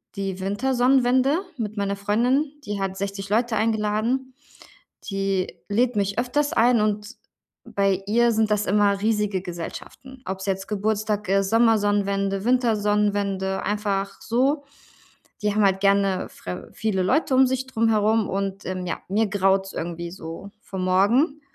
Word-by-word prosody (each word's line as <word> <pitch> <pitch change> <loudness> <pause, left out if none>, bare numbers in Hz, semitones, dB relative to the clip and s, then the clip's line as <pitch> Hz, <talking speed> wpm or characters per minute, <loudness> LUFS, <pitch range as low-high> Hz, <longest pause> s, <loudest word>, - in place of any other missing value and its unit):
die 195 -2 -3
Wintersonnenwende 255 - +2 0.2
mit 215 -2 -4
meiner 200 0 -1
Freundin, 240 +9 +1
die 205 -1 -3
hat 195 -1 -2
60 195 0 -4
Leute 230 +2 +1
eingeladen. 220 +4 0 0.8
Die 195 -2 -1
lädt 240 +4 +1
mich 200 0 -1
öfters 285 +4 0
ein, 235 0 +4
und 210 0 -1 0.6
bei 195 -1 0
ihr 235 +3 +3
sind 220 -1 +1
das 210 0 +1
immer 200 0 +2
riesige 210 -3 0
Gesellschaften, 185 +9 -8
ob's 190 0 -4
jetzt 190 0 -2
Geburtstag 210 -1 -1
ist, 195 0 +2
Sommersonnenwende, 205 -3 +2
Wintersonnenwende, 205 -5 +1
einfach 200 -1 -2
so. 275 +5 +1 0.8
Die 210 -1 +1
haben 210 0 +3
halt 190 -1 +2
gerne 195 -1 +2
fre 90 0 -8
viele 210 -4 -1
Leute 265 - +1
um 265 0 +6
sich 260 +1 -2
drumherum 220 -3 +2
und, 195 +1 -3
ähm, 185 0 -4
ja, 175 - -3
mir 215 +4 +2
graut's 195 -1 +1
irgendwie 170 0 -5
so 170 +2 -8
vor 190 - -7
morgen. 215 - +2
205 Hz, 140 wpm, -24 LUFS, 195-230 Hz, 0.8 s, um